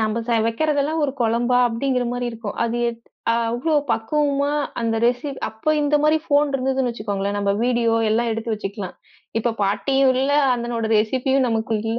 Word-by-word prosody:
நம்ப 220 Hz, +1 st, 0 dB
ச -, -, -3 dB, 0.2 s
வைக்கிறது 290 Hz, +6 st, 0 dB
எல்லாம் 315 Hz, +3 st, -1 dB
ஒரு 275 Hz, -, -1 dB
கொழம்பா? 240 Hz, +2 st, +2 dB
அப்டிங்கிற 250 Hz, +2 st, -1 dB
மாரி 245 Hz, 0 st, -2 dB
இருக்கும். 225 Hz, -3 st, -7 dB
அது 235 Hz, 0 st, -2 dB
எத் 235 Hz, -1 st, -6 dB, 0.3 s
அவ்வளோ 235 Hz, +7 st, 0 dB, 0.2 s
பக்குவமா 285 Hz, +4 st, 0 dB, 0.3 s
அந்த 225 Hz, -1 st, 0 dB
ரெஸி 245 Hz, +4 st, +1 dB, 0.2 s
அப்ப 265 Hz, +8 st, -1 dB
இந்த 295 Hz, 0 st, +1 dB
மாரி 305 Hz, +1 st, +4 dB
ஃபோன் 290 Hz, -1 st, +2 dB
இருந்ததுன்னு 265 Hz, -1 st, 0 dB
வச்சுக்கோங்களேன், 205 Hz, -3 st, -3 dB
நம்ப 200 Hz, -1 st, +1 dB
வீடியோ 235 Hz, -2 st, +2 dB, 0.2 s
எல்லாம் 230 Hz, +2 st, +1 dB
எடுத்து 225 Hz, 0 st, -2 dB
வச்சுக்கலாம். 200 Hz, -2 st, -6 dB, 0.4 s
இப்ப 230 Hz, 0 st, -1 dB
பாட்டியும் 265 Hz, +7 st, +2 dB
இல்ல, 280 Hz, +1 st, +1 dB, 0.2 s
அந்தனோட 235 Hz, -1 st, -3 dB
ரெசிப்பியும் 260 Hz, +4 st, +1 dB
நமக்கு 225 Hz, 0 st, -1 dB
இல்ல. 225 Hz, +1 st, -2 dB
240 Hz, 165 wpm, -22 LUFS, 225-270 Hz, 0.4 s, மாரி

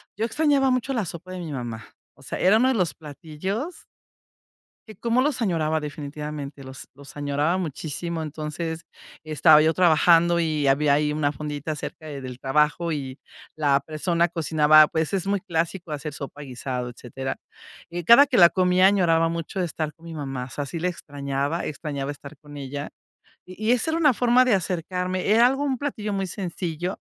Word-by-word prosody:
yo 215 Hz, -, -3 dB
extrañaba 275 Hz, +1 st, +2 dB
mucho 255 Hz, +2 st, 0 dB
la 230 Hz, -5 st, 0 dB
sopa 175 Hz, +2 st, -8 dB
de 185 Hz, -, -6 dB
mi 165 Hz, -3 st, -6 dB
mamá, 120 Hz, -5 st, -5 dB, 0.3 s
o -, -, -19 dB
sea, -, -, -5 dB
era 190 Hz, +3 st, +5 dB
uno 255 Hz, +3 st, +3 dB
de -, -, +2 dB
los 180 Hz, -9 st, 0 dB
platillos 170 Hz, -, -6 dB, 1.0 s
que 215 Hz, -, -10 dB
cómo 235 Hz, +2 st, +1 dB
los 280 Hz, -3 st, 0 dB
añoraba 160 Hz, -6 st, +1 dB
definitivamente 150 Hz, -1 st, -6 dB
los 130 Hz, 0 st, -10 dB
los 140 Hz, 0 st, -13 dB
añoraba 145 Hz, +4 st, 0 dB
muchísimo. 165 Hz, 0 st, -4 dB
Entonces, 155 Hz, +2 st, -5 dB, 0.4 s
estaba 155 Hz, 0 st, +5 dB
yo 160 Hz, +1 st, +3 dB
trabajando 170 Hz, 0 st, +4 dB
y 155 Hz, -3 st, 0 dB
había 140 Hz, +1 st, +3 dB
ahí 150 Hz, +1 st, +1 dB
una 145 Hz, -1 st, 0 dB
fondita 150 Hz, 0 st, -5 dB
cerca 155 Hz, +1 st, -8 dB
de 145 Hz, -2 st, -6 dB
del 130 Hz, -1 st, -8 dB
trabajo 150 Hz, +5 st, +1 dB
y 135 Hz, -3 st, -5 dB, 0.4 s
la 145 Hz, -3 st, +2 dB
persona 165 Hz, +4 st, 0 dB
cocinaba, 155 Hz, -2 st, +5 dB
pues, 160 Hz, +3 st, -2 dB
es 195 Hz, 0 st, -1 dB
muy 200 Hz, 0 st, +1 dB
clásico 170 Hz, +1 st, -3 dB
hacer 150 Hz, 0 st, -5 dB
sopa, 145 Hz, +1 st, -8 dB
guisado, 125 Hz, -2 st, -5 dB
etcétera. 130 Hz, +2 st, -6 dB, 0.5 s
Eh, 175 Hz, 0 st, -4 dB
cada 235 Hz, -, +8 dB
que 260 Hz, -3 st, 0 dB
la 170 Hz, -2 st, +8 dB
comía, 185 Hz, 0 st, +4 dB
añoraba 165 Hz, -4 st, +3 dB
mucho 170 Hz, +3 st, -4 dB
de 180 Hz, -, +1 dB
estar 155 Hz, -2 st, -4 dB
con 165 Hz, -, -19 dB
mi 165 Hz, -, -8 dB
mamá. 135 Hz, -4 st, -4 dB
O -, -, -12 dB
sea, 145 Hz, +2 st, -4 dB
si 165 Hz, +4 st, -5 dB
le 175 Hz, -, 0 dB
extrañaba, 145 Hz, -2 st, -3 dB
extrañaba 145 Hz, -2 st, -4 dB
estar 145 Hz, +1 st, -11 dB
con 145 Hz, +1 st, -12 dB
ella 140 Hz, +1 st, -5 dB, 0.6 s
y 185 Hz, +4 st, -9 dB
y -, -, +5 dB
esa 250 Hz, +5 st, +1 dB
era 320 Hz, -, 0 dB
una 295 Hz, -6 st, +4 dB
forma 245 Hz, +2 st, +4 dB
de 250 Hz, -4 st, +3 dB
acercarme. 185 Hz, 0 st, -2 dB
Era 230 Hz, +3 st, +6 dB
algo, 270 Hz, +3 st, 0 dB
un 265 Hz, -3 st, -1 dB
platillo 220 Hz, -7 st, -3 dB
muy 195 Hz, -1 st, -1 dB
sencillo, 175 Hz, -1 st, -4 dB
160 Hz, 185 wpm, -24 LUFS, 145-185 Hz, 1.0 s, cada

